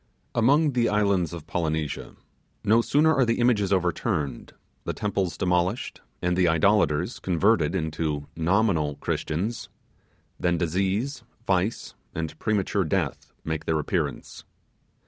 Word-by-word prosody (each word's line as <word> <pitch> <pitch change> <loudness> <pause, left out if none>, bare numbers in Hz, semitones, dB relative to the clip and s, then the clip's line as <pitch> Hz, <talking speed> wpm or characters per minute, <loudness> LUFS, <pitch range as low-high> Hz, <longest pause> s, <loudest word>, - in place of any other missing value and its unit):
Among 145 +6 +4
the 120 -3 +2
islands 100 -4 +1
of 85 -3 -8
Polynesia, 80 -3 -3 0.5
no 115 +3 +4
sooner 155 +6 +3
are 135 - +3
the 115 -1 +1
images 110 -5 +2
overturned, 85 -7 -1 0.3
the - - -3
temples 95 -3 -1
demolished, 90 +3 0 0.2
and 90 0 +1
the 90 -1 +3
idolators 85 - +2
converted 95 -1 +2
into 80 -3 -2
NOMINAL 85 -3 +1
Christians, 95 +10 -2 0.7
that 85 -1 +1
disease, 95 - -1 0.2
vice, 95 +3 0 0.2
and 80 -1 -3
premature 100 -2 0
death 80 - -2
make 80 -1 -3
their 80 - +1
appearance. 75 - -3
90 Hz, 120 wpm, -26 LUFS, 80-110 Hz, 0.7 s, Among